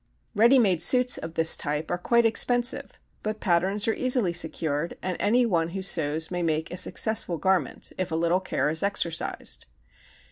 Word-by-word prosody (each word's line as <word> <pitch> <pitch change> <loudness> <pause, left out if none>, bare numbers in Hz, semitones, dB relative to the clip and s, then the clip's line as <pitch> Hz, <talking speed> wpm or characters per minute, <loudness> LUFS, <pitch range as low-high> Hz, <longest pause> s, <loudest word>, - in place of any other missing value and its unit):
Ready 235 +5 +4
made 190 -9 +2
suits 250 +7 +4
of 160 0 -8
this 160 0 +5
type 150 +2 -4
are 175 - -1
quite 235 +5 +2
expensive 245 +2 +1 0.2
but 215 0 -4
patterns 190 +4 0
are 225 - +2
easily 250 -8 +1
secured 160 -2 -1
and 185 -1 -2
any 240 +4 +2
one 170 -7 0
who 190 - -4
sews 160 -3 0
may 180 -1 -3
make 160 -1 -2
a 180 - -6
successful 210 -4 0
garment 185 -2 -1
if 185 -2 -3
a - - -2
little 170 +2 +1
care 150 -5 -2
is 160 - 0
exercised. 185 -5 -2
180 Hz, 175 wpm, -25 LUFS, 165-220 Hz, 0.2 s, this